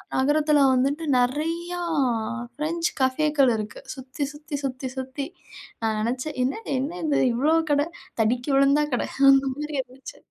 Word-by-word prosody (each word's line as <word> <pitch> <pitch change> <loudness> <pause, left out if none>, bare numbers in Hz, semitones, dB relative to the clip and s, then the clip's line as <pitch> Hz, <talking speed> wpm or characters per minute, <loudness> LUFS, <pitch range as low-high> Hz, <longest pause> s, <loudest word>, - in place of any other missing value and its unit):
நகரத்தில 295 +2 +3
வந்துட்டு 275 +5 +1
நெறையா 325 +8 0 0.8
ஃப்ரெஞ்ச் 330 +4 -1
கஃபேக்கள் 275 +1 +3
இருக்கு, 215 -1 -5
சுத்தி 265 +2 -6
சுத்தி 295 0 -7
சுத்தி 260 -1 -3
சுத்தி. 265 +2 -4 0.6
நான் 220 -1 0
நினைச்சேன் 255 +7 -2
என்னது, 280 - -3
என்ன 295 +7 -3
இது? 300 -3 +2
இவ்வளோ 285 +7 +2 0.2
கடை. 290 0 +3 0.3
தடுக்கி 240 +4 +1
விழுந்தா 275 +2 +4
கடை. 245 - 0 0.2
அந்த 270 0 +6
மாதிரி 300 +2 -5
இருந்துச்சு 260 +1 -12
275 Hz, 135 wpm, -25 LUFS, 255-300 Hz, 0.8 s, அந்த